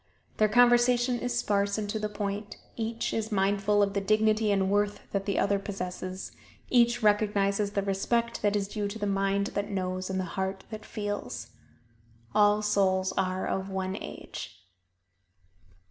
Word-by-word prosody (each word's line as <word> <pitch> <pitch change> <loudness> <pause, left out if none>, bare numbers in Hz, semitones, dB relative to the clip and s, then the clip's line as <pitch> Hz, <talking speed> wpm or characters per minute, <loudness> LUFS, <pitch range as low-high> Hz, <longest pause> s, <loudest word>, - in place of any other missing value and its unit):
Their 215 0 +4
conversation 245 +1 +4
is 245 0 -2
sparse 200 -2 +1
and 210 -1 -2
to 220 - -2
the 210 0 -2
point; 205 0 -4 0.2
each 230 0 -2
is 220 0 -2
mindful 205 +1 +2
of 200 -1 0
the 200 - 0
dignity 215 +1 +2
and 195 -1 +2
worth 205 0 +1
that 200 0 -2
the 200 - 0
other 200 0 +2
possesses: 185 -1 -5 0.4
each 235 -1 +4
recognizes 205 -1 +2
the 200 - 0
respect 230 +4 0
that 205 0 +2
is 200 -1 0
due 205 0 -3
to 200 +2 -5
the 205 - -2
mind 195 0 0
that 205 0 -2
knows 185 -1 -2
and 190 0 -1
the - - 0
heart 190 +1 -3
that 215 -1 -7
feels. 205 - -5 0.8
"All 210 0 +4
souls 190 -2 +2
are 185 0 0
of 190 0 -2
one 190 0 -2
age." - - -8
205 Hz, 160 wpm, -28 LUFS, 195-215 Hz, 0.8 s, Their